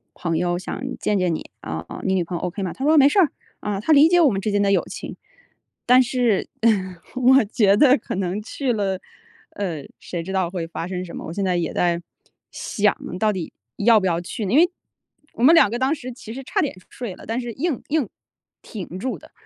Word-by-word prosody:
朋 165 -2 -2
友 175 0 0
想 185 - -6 0.2
见 210 -2 +1
见 175 -3 +1
你， - - -8
啊， 80 +1 -5
哦， - - -7
你 190 - +1
女 180 - +1
朋 175 +1 -5
友 - - -7
OK 180 +2 -3
吗？ 180 - -3
他 265 - -7
说 310 +1 +5
没 275 - +8
事， 290 - +3 0.4
啊。 205 -2 -3
她 275 +10 +2
理 295 +2 +7
解 355 - +5
我 310 -6 +5
们 195 -1 -2
之 210 - -1
间 205 0 +2
的 200 - +2
友 - - +3
情， - - -7 0.7
但 250 +1 +6
是， 240 -4 +1
呃， 190 -5 +1 0.2
我 255 0 +5
觉 200 -2 +3
得 265 +1 +6
可 225 - -6
能 190 +2 -2
去 250 +3 -2
了， 195 -3 -1 0.5
呃， 170 -8 -4
谁 170 -2 -5
知 190 +2 -6
道 185 -3 +1
会 175 -3 -3
发 165 +1 -5
生 185 -1 -4
什 170 - -9
么？ - - -6
我 - - -5
现 200 0 -1
在 180 -1 +1
也 170 - -1
在 170 -1 +1 0.5
想 210 -2 0 0.2
到 215 +1 +3
底 185 -5 -5 0.2
要 220 +1 +5
不 190 - 0
要 170 -2 +1
去 200 +5 -5
呢？ 195 - -1
因 - - +5
为 350 - +6 0.7
我 230 - -3
们 295 +6 +8
2 265 - +6
个 235 - -2
当 265 +3 +2
时 255 -5 -6
其 230 -2 -9
实 270 - -6
差 - - 0
点 290 - -2
睡 230 -7 -6
了， - - -13
但 225 +3 -1
是 240 -1 -5
硬 295 +2 -2
硬 290 -8 0 0.5
挺 185 -5 -7
住 260 +4 -3
的。 - - -17
205 Hz, 255 characters per minute, -22 LUFS, 180-250 Hz, 0.7 s, 没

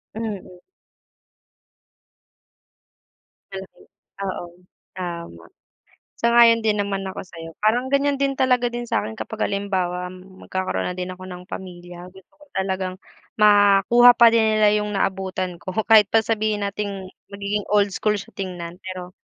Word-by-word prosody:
Mm. 205 -5 -6 2.9
Malaki, 195 0 -9 0.4
oo 185 -2 -4 0.5
tama. 170 - -7 0.8
Sang-ayon 235 -1 +6
din 215 -1 +1
naman 200 -1 -1
ako 190 - -7
sa’yo. 165 -2 -11
Parang 245 +4 +2
ganiyan 280 0 +1
din 275 -1 0
talaga 250 -2 +2
din 240 0 -5
sa'kin 110 - -2
kapag 220 0 -3
halimbawa 185 -3 -2
magkakaroon 185 0 -5
na 180 - -2
din 180 0 -5
ako 185 0 -9
ng 180 -1 -10
pamilya, 180 -1 -9
gusto 190 -1 -17
ko 295 - -18
talagang 190 -1 -3 0.4
makuha 205 +4 +6
pa 235 -1 +7
din 225 -1 +3
nila 210 -1 +5
yung 210 0 -2
naabutan 190 -2 -2
ko 185 +2 -7 0.2
kahit 215 -3 +6
pa 225 - +5
sabihin 215 -1 -1
nating 200 -1 -4 0.2
magiging 200 +1 -3
old 205 -1 +4
school 210 +2 0
siya - - -14
tingnan. 175 -3 -6
Pero 185 -1 -7
195 Hz, 135 wpm, -22 LUFS, 185-220 Hz, 2.9 s, pa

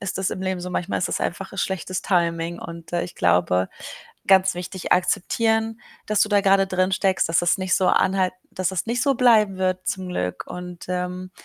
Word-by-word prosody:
ist 195 -1 -4
das 190 - 0
im 185 - -5
Leben 185 -1 -2
so, 180 - -5
manchmal 180 +1 -2
ist 180 - -1
das - - -2
einfach 195 +2 -4
schlechtes 185 -1 -2
Timing. 170 -2 0
Und, 170 0 -9
äh, 175 - 0
ich 175 - -10
glaube, 90 +1 +2 0.6
ganz 190 -1 +5
wichtig, 180 +1 -3
akzeptieren, 225 +5 +1 0.3
dass 215 -1 +1
du 215 - +1
da 205 -1 +3
grade 195 -1 +4
drinsteckst, 190 0 +1
dass 165 - +2
das 175 +2 +2
nicht 185 0 +1
so 185 - +2
anhalt 185 -1 +2 0.2
dass 185 -2 -1
das 190 0 -3
nicht 240 +2 0
so 280 -1 +2
bleiben 220 -6 +4
wird 185 0 -1
zum 185 -1 -3
Glück. 90 - -3
Und, 180 -1 -8
ähm, 180 0 -3
185 Hz, 200 wpm, -23 LUFS, 175-195 Hz, 0.6 s, ganz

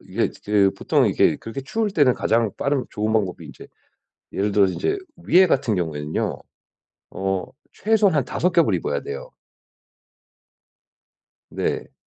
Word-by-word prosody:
이게 - - -2
이제 100 -2 +1
보통은 - - +2
이게 - - +3
그렇게 115 +4 -7
추울 215 +10 -1
때는 145 -9 +3
가장 115 -1 +1
빠른 140 -2 0
좋은 110 +1 -2
방법이 100 -5 -1
인제 - - -12 0.7
예를 100 +1 -1
들어서 100 -2 +3
인제 395 - -1 0.3
위에 185 +2 +6
같은 130 -9 +1
경우에는요 80 -4 -2 0.7
어 95 -1 -2 0.3
최소한 200 - +2
5 180 +7 0
겹을 170 -1 +3
입어야 475 +4 -1
돼요. 485 +4 -7 2.2
네. - - -3
125 Hz, 275 characters per minute, -22 LUFS, -, 2.2 s, 위에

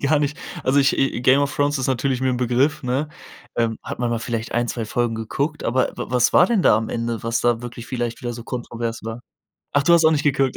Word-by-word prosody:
gar 145 +2 +3
nicht, 145 0 -1 0.3
also, 135 +2 +2
i - - +6
ich 135 -2 +1
„Game 130 +3 +5
of 145 +1 -1
Thrones“ 145 0 +1
ist 130 - -1
natürlich 130 0 0
mir 130 - +1
'n 125 - -1
Begriff, 125 +4 +1
ne? 130 +4 -1 0.5
Ähm, 115 -1 0
hat - - -6
man 120 -1 -1
mal 115 - 0
vielleicht 115 0 -4
1, 120 0 0
2 115 - -3
Folgen 120 +1 -1
geguckt, 140 +7 -3
aber 130 +2 +2
w - - -3
was 125 -1 +2
war - - +7
denn 225 -1 +2
da - - +5
am 110 0 -2
Ende, 115 -1 -3
was 115 0 0
da 120 -1 +1
wirklich 120 -1 -8
vielleicht 120 -2 -3
wieder 120 -1 -4
so 115 0 -9
kontrovers 120 -2 -4
war? 115 +1 -5 0.5
Ach, 145 -1 +2
du 170 - +5
hast 170 -1 +5
auch 160 - +7
nicht 150 -2 +1
geguckt? 135 -2 +1
125 Hz, 255 wpm, -22 LUFS, 115-140 Hz, 0.5 s, war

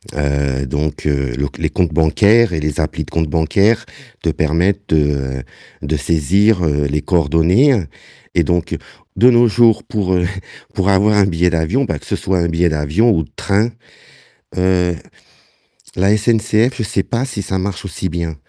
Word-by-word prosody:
Heu, 70 -2 -1
donc, 75 +3 -3
heu, 70 -4 -1
le 70 - 0
c - - -5
les - - 0
comptes 85 -4 -1
bancaires 100 +7 +3
et 80 - -1
les 75 -1 -3
applis - - -2
de - - -16
comptes 80 -2 -1
bancaires 100 +8 +1 0.4
te 85 - +1
permettent 90 +7 0
de 70 -4 0 0.4
de 75 +2 -2
saisir, 90 +7 +2
heu, 75 -1 0
les 75 +1 -2
coordonnées 90 - +2 0.5
et 85 - +3
donc 85 +2 -1 0.4
de 125 +2 +6
nos 120 0 +5
jours, 115 0 +3
pour, 100 -4 -2
heu, 90 - +1 0.5
pour 95 +1 0
avoir 100 +2 +3
un 100 - +4
billet 90 -1 +1
d'avion, 85 - 0
bah, 80 - -3
que - - -18
ce - - -2
soit 95 -1 -1
un 85 - +1
billet 85 +1 +1
d'avion 80 +10 +1
ou 80 -6 +1
de - - -16
train, 105 +4 0 0.9
heu, 90 -1 +1 1.0
la 100 +3 +2
SNCF, 110 +2 +1
je 120 - -2
sais 100 -2 -1
pas 120 +2 -2
si 115 -6 -5
ça 95 0 -3
marche 95 -2 -4
aussi 95 0 -4
bien, 85 -1 -4
90 Hz, 180 wpm, -17 LUFS, 75-105 Hz, 1.0 s, de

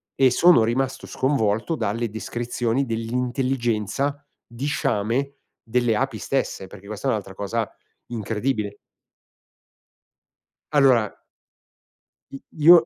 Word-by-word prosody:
e 130 -2 +5
sono 170 -4 +6
rimasto 130 +4 -1
sconvolto 130 +1 +1
dalle 115 -2 -1
descrizioni 120 +3 -1
dell'intelligenza 125 +2 -1 0.2
di 120 +4 -6
sciame 130 0 0 0.3
delle 120 -1 +1
api 130 -3 -1
stesse, 130 -8 -2
perché 100 0 -13
questa 110 +5 -4
è - - +4
un'altra 100 -4 -3
cosa 105 +2 -2 0.4
incredibile. 110 -1 -2 1.9
Allora 130 -7 +4 1.1
i 135 - -8 0.2
io 165 +2 +8
120 Hz, 100 wpm, -24 LUFS, 110-135 Hz, 1.9 s, io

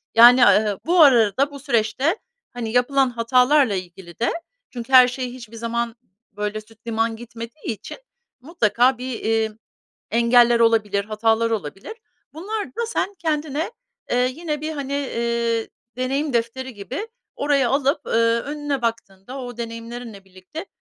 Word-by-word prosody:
Yani, 240 +2 +8
a 210 - +6
ııı, 210 -2 -2
bu 345 +1 +4
arada 260 -1 +5
bu 280 - -9
süreçte, 265 - 0 0.4
hani, 235 -2 -4
yapılan 260 +2 +2
hatalarla 250 +1 +3
ilgili 180 -1 -8
de, 235 - +1 0.4
çünkü 245 +1 -8
her 255 -1 +9
şey 250 0 -4
hiçbir 235 -3 -11
zaman 235 0 -3 0.4
böyle 210 +1 -4
süt 225 +2 -22
liman 225 0 0
gitmediği 235 +2 -7
için 205 - -10 0.4
mutlaka 255 - +2
bir, 250 -1 -5
eee, 220 0 0 0.6
engeller 235 +1 +4
olabilir, 210 -3 +2
hatalar 225 +1 +1
olabilir. 195 - -4 0.4
Bunlar 405 +6 -4
da 470 +1 -4
sen 410 -3 -2
kendine, 310 0 -2 0.4
eee, 250 +1 +2
yine 310 -3 -3
bir, 310 +1 -3
hani, 280 -2 -5
eee, 235 -4 -1 0.3
deneyim 270 +3 -1
defteri 240 +2 -2
gibi 260 - -6 0.3
oraya 280 -4 +2
alıp, 275 +2 +1
ııı, 230 0 +2
önüne 290 -2 -3
baktığında 230 +1 -4
o 245 -2 -7
deneyimlerinle 230 -2 -7
birlikte 190 - -10
240 Hz, 140 wpm, -22 LUFS, 225-275 Hz, 0.6 s, her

